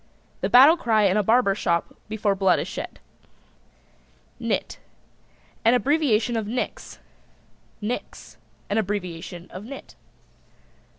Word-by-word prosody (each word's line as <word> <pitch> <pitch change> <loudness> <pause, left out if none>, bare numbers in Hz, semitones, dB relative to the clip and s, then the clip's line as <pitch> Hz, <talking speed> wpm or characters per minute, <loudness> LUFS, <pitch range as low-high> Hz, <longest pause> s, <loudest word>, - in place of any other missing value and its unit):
The - - -1
battle 280 +7 +8
cry 220 -8 +2
in 195 -1 +3
a 210 - +3
barber 220 0 +3
shop 170 -4 -1 0.2
before 215 -2 0
blood 190 -1 +3
is - - -3
shed. - - -7 1.4
NIT. - - -2 0.8
An 230 +2 +5
abbreviation 250 -3 +2
of 220 -2 -2
Nix. 245 +4 -4 0.8
NIX. 220 +4 -6 0.3
An 205 - 0
abbreviation 180 -4 -4
of 185 - -8
Nit. 265 +4 -10
215 Hz, 115 wpm, -24 LUFS, 195-245 Hz, 1.4 s, battle